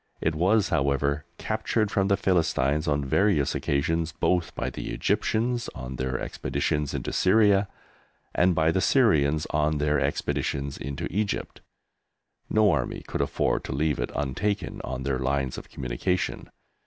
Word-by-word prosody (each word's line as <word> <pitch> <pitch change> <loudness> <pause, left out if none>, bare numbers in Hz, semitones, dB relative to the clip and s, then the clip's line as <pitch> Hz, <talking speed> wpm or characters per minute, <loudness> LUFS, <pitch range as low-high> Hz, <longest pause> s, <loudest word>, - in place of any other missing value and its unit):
It 80 - 0
was, 95 +6 +2
however, 70 -2 +1
captured 110 -1 -1
from 95 -1 +1
the 100 -1 +3
Philistines 75 -4 +1
on 70 -1 +1
various 80 -1 +2
occasions 80 +4 0
both 85 0 0
by - - -2
the - - -6
Egyptians 120 +2 0
on 65 0 -6
their 65 0 -2
expeditions 75 -1 -2
into - - -3
Syria 100 0 +4 0.7
and 90 +1 +3
by 80 +1 +3
the 95 - +1
Syrians 80 - +3
on 75 0 +1
their 75 0 +1
expeditions 70 0 -1
into 70 0 -5
Egypt. 105 +2 -2 0.9
No 110 -2 +4
army 70 -6 -2
could - - -2
afford - - 0
to - - -4
leave 75 +1 0
it - - -1
untaken 75 +10 -2
on 65 - -4
their 65 -1 -1
lines 65 0 -1
of - - -15
communication. 65 +9 -2
80 Hz, 145 wpm, -26 LUFS, 70-95 Hz, 0.9 s, Syria